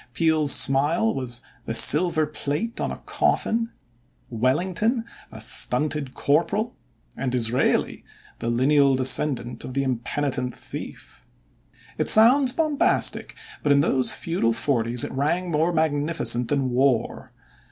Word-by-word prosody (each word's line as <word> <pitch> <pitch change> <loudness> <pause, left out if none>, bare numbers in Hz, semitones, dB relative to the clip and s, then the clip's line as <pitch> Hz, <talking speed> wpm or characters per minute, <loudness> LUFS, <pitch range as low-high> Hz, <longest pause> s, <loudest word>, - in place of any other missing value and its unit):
Peel's 155 +1 +1
smile 150 +11 +3
was 125 -2 -1 0.3
"the 115 - -2
silver 155 +5 +6
plate 150 +9 -4
on - - -2
a - - -7
coffin", 230 +1 -1 0.6
Wellington 180 - -1 0.3
"a - - -11
stunted 150 -3 +1
corporal", 200 +10 -1 0.4
and 130 -2 -4
Disraeli 125 0 0 0.4
"the 115 - -4
lineal 135 +3 +2
descendant 130 -1 0
of 130 - -9
the 140 - 0
impenitent 130 0 -3
thief." - - -11 0.8
It - - 0
sounds 250 +5 +6
bombastic, 305 0 -1 0.3
but 145 - 0
in 140 0 +4
those 130 -3 +1
feudal 165 -9 -2
forties 120 -1 -1
it 145 - -5
rang 170 +7 -2
more 160 +3 0
magnificent 150 -6 -1
than 135 -2 -1
war. 125 -1 -1
145 Hz, 120 wpm, -23 LUFS, 130-170 Hz, 0.8 s, silver